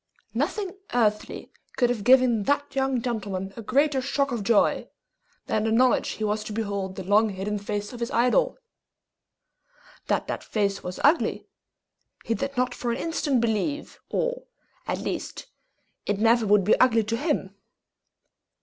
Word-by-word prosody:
Nothing 395 -3 -2 0.2
earthly 215 -3 0 0.3
could 245 -2 +3
have 225 -4 -3
given 250 -2 +5
that 285 0 0
young 265 -3 0
gentleman 195 -5 -3
a 230 - -7
greater 275 +4 +2
shock 275 +1 0
of 235 -3 -2
joy 215 0 +2 0.6
than 215 - 0
the 220 - 0
knowledge 250 +3 +3
he 220 - -5
was 210 0 0
to - - -6
behold 200 -3 -3
the 190 - -6
long 210 +4 +3
hidden 205 +2 -3
face 205 +1 -4
of 240 - -8
his 235 0 -2
idol. 275 - +2 1.5
That - - 0
that - - -4
face 200 -2 -1
was 180 0 -6
ugly, 305 +4 +3 0.8
he 230 - 0
did 275 +2 -4
not 250 0 +1
for 245 - -4
an 235 - -1
instant 295 -6 0
believe, 235 +6 -2
or, - - -2 0.4
at - - -1
least, - - -5 0.6
it 205 - +1
never 225 +1 +3
would 205 -1 +5
be 210 - +4
ugly 230 -3 +4
to 225 +2 -2
him. 280 - -1
230 Hz, 160 wpm, -25 LUFS, 210-265 Hz, 1.5 s, given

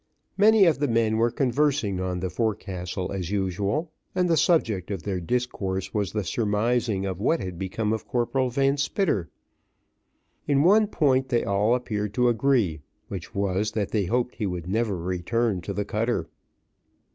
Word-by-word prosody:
Many 210 0 +6
of 160 -5 +3
the 145 - +1
men 115 -2 +2
were 115 +1 +3
conversing 130 -6 +1
on 90 -1 -2
the 95 -1 -2
forecastle 95 -4 -3
as 95 -3 -3
usual, 100 - -1 0.2
and 180 -1 +2
the 170 - +3
subject 115 - +2
of 95 -5 -4
their 95 -3 -2
discourse 95 -2 -2
was 105 -3 -1
the 105 -1 -2
surmising 110 +1 0
what 100 - 0
had 90 -2 -6
become 105 +3 -1
of 110 - -4
Corporal 125 +1 0
Van 135 +3 +1
Spitter. 145 - 0 1.2
In 140 -1 +3
one 210 +5 +5
point 135 -8 +1
they 120 -1 +2
all 105 +4 +2
appeared 105 -4 -3
to 125 -1 +3
agree, 115 - +1 0.3
which 95 +1 -7
was, 100 +2 0
that 105 -3 -2
they 105 -3 +1
hoped 125 +5 0
he 105 - -1
would 90 -2 -4
never 105 0 0
return 95 +4 -1
to 95 - -5
the 105 +1 -2
cutter. 115 +4 -1
110 Hz, 165 wpm, -25 LUFS, 95-125 Hz, 1.2 s, Many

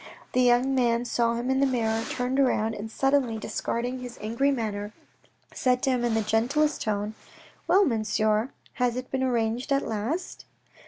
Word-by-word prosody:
The 255 - +2
young 250 +2 +4
man 240 -2 +2
saw 235 -1 +1
him 240 +2 -1
in 265 - +2
the 275 - +4
mirror, 225 -3 0
turned 255 +2 -1
round, 225 -4 +2
and 215 +1 -6
suddenly 270 -2 +1
discarding 245 +3 -3
his 245 -1 -8
angry 230 +6 0
manner, 215 -5 -2 0.6
said 250 -1 +1
to 270 - +3
him 250 -2 0
in 235 -2 +1
the 220 - +1
gentlest 265 +8 +1
tone, 210 -1 -2 0.3
" - - -26
Well, 385 +4 +5
Monsieur, 215 -2 +1 0.3
has 245 -1 +2
it 255 0 -6
been 265 - -1
arranged 240 +1 0
at 275 0 +1
last 230 - -3
240 Hz, 175 wpm, -26 LUFS, 225-265 Hz, 0.6 s, Well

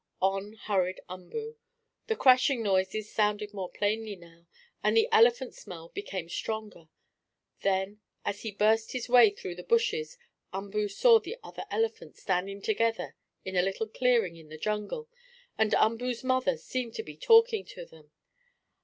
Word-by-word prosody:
On 195 +2 0
hurried 190 -4 -1
Umboo. 445 - -7 0.5
The 445 - 0
crashing 255 - +4
noises 200 +2 0
sounded 210 0 0
more 190 -3 -5
plainly 210 +1 -2
now, 170 -1 -18 0.4
and 215 +2 +3
the 225 - +5
elephant 240 +3 +4
smell 165 -2 -10
became 190 - -5
stronger. 210 -3 -5 0.7
Then, 195 +2 -1 0.2
as 205 - -3
he 225 - -4
burst 215 +2 +2
his 250 -2 -3
way 240 -3 +8
through 195 -3 -7
the 180 - -9
bushes, 465 +1 0 0.3
Umboo 200 +2 -2
saw 455 - +5
the 440 +4 -7
other - - -8
elephants 450 0 -2
standing 195 +2 -2
together 225 +1 0 0.3
in 190 0 -5
a 180 - +5
little 195 +4 -2
clearing 225 -7 +1
in 160 -2 -15
the 155 - -9
jungle, 210 - -3 0.5
and 220 -1 +2
Umboo's 235 +2 +1
mother 255 +1 +1
seemed 250 -3 -4
to 445 - -4
be - - -10
talking 455 -3 +5
to 175 - -10
them. 155 -2 -18
215 Hz, 155 wpm, -29 LUFS, 190-255 Hz, 0.7 s, way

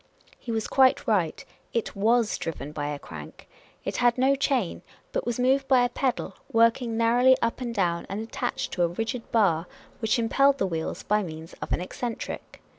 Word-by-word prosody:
He 235 - -6
was 220 -1 -1
quite 265 -1 +4
right: 185 -8 +1 0.3
it 230 - -1
was 225 +2 +2
driven 150 -3 -5
by 145 -1 -3
a 145 0 -3
crank. 80 - -11 0.4
It - - -2
had 240 0 +3
no 265 +2 +4
chain, 270 -8 0 0.3
but - - -2
was 240 0 -1
moved 270 +2 +2
by 255 -2 +5
a - - 0
pedal, 255 0 -1 0.2
work 230 +1 +4
ing 230 -2 -3
narrowly 245 +3 +5
up 230 +2 -1
and 245 - -2
down, 175 -6 0
and 195 +2 -3
attached 225 +1 -3
to 180 - -2
a 175 - +4
rigid 225 +7 -4
bar, 180 -7 +3 0.3
which 220 0 +1
impelled 275 +4 +3
the 195 - +1
wheels 165 -3 -3
by 210 +1 +2
means 160 -3 -7
of - - -5
an - - +1
eccentric. 230 +5 -5
225 Hz, 190 wpm, -26 LUFS, 180-250 Hz, 0.4 s, by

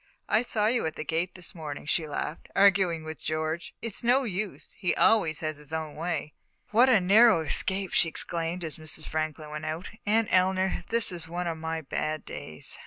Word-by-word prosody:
"I 215 - +3
saw 220 -3 0
you 230 -5 +2
at 160 - -5
the - - -4
gate 165 +3 -2
this 180 -2 -4
morning," 150 -4 -7
she 155 +1 +1
laughed, 150 +2 -5
"arguing 190 -4 +4
with 155 -1 -8
George. 155 +2 -3
It's 230 -1 -3
no 250 +3 +4
use 205 -3 -4
he 180 - 0
always 165 -9 +3
has 155 -2 -2
his 150 0 -10
own 160 -2 -4
way." 160 -2 -3 0.4
"What 240 +5 +6
a 225 -5 +6
narrow 200 +1 +6
escape!" 190 +4 0
she 165 - +3
exclaimed, 170 +2 -2
as 160 -2 -4
Mrs. 155 0 -3
Franklin 155 -1 -3
went 150 +1 -5
out. 160 +4 -4 0.2
"Aunt 220 +1 +3
Eleanor, 185 -1 +2
this 230 -3 +4
is 170 -2 -3
one 175 +2 -3
of 165 -2 -3
my 160 0 -3
bad 155 +1 -3
days." 75 0 -6
170 Hz, 195 wpm, -28 LUFS, 155-195 Hz, 0.4 s, What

